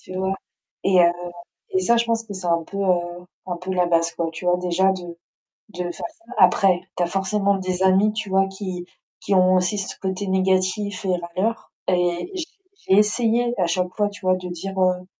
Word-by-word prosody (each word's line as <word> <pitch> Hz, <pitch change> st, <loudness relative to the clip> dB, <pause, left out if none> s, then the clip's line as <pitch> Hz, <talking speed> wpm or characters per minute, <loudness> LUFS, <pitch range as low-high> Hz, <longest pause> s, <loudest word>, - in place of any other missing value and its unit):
Tu 185 Hz, -, -10 dB
vois? 190 Hz, +1 st, 0 dB, 0.5 s
Et 190 Hz, -1 st, +4 dB
heu, 170 Hz, 0 st, +5 dB, 0.6 s
et 185 Hz, -, +2 dB
ça 235 Hz, +6 st, +3 dB
je 235 Hz, -, +2 dB
pense 230 Hz, 0 st, 0 dB
que 210 Hz, -, -8 dB
c'est 185 Hz, -2 st, -5 dB
un 170 Hz, -1 st, +2 dB
peu, 195 Hz, -, -8 dB
heu, 175 Hz, -2 st, 0 dB, 0.2 s
un 180 Hz, -2 st, -4 dB
peu 185 Hz, +2 st, -5 dB
la 180 Hz, -1 st, +2 dB
base, 170 Hz, -1 st, +2 dB
quoi, 165 Hz, -1 st, -2 dB
tu 160 Hz, +3 st, -8 dB
vois, 180 Hz, 0 st, +3 dB
déjà 180 Hz, +2 st, +2 dB
de 175 Hz, -2 st, -6 dB, 0.5 s
de 180 Hz, -2 st, -4 dB
faire -, -, -3 dB
ça. 340 Hz, +1 st, -8 dB
Après 185 Hz, -3 st, +5 dB, 0.2 s
tu -, -, 0 dB
as -, -, +3 dB
forcément 195 Hz, +2 st, +1 dB
des 185 Hz, -1 st, -2 dB
amis 190 Hz, +3 st, +4 dB
tu 215 Hz, -1 st, -4 dB
vois, 195 Hz, 0 st, +3 dB
qui 185 Hz, -2 st, -6 dB, 0.3 s
qui 200 Hz, -, 0 dB
ont 185 Hz, 0 st, +5 dB
aussi 185 Hz, +3 st, +1 dB
ce 195 Hz, -, -5 dB
côté 190 Hz, +1 st, -2 dB
négatif 190 Hz, +2 st, 0 dB
et 185 Hz, -, +2 dB
râleur, 185 Hz, +6 st, -3 dB, 0.2 s
et 180 Hz, -, +1 dB
j 355 Hz, -4 st, -2 dB, 0.4 s
j'ai 190 Hz, -, +4 dB
essayé 235 Hz, +3 st, +2 dB
à 180 Hz, -, +2 dB
chaque 180 Hz, +2 st, 0 dB
fois, 205 Hz, -1 st, +2 dB
tu 205 Hz, 0 st, -12 dB
vois, 185 Hz, 0 st, +4 dB
de 185 Hz, -, -7 dB
dire, 190 Hz, +2 st, -6 dB
heu: 185 Hz, -1 st, +1 dB
185 Hz, 215 wpm, -23 LUFS, 180-200 Hz, 0.6 s, heu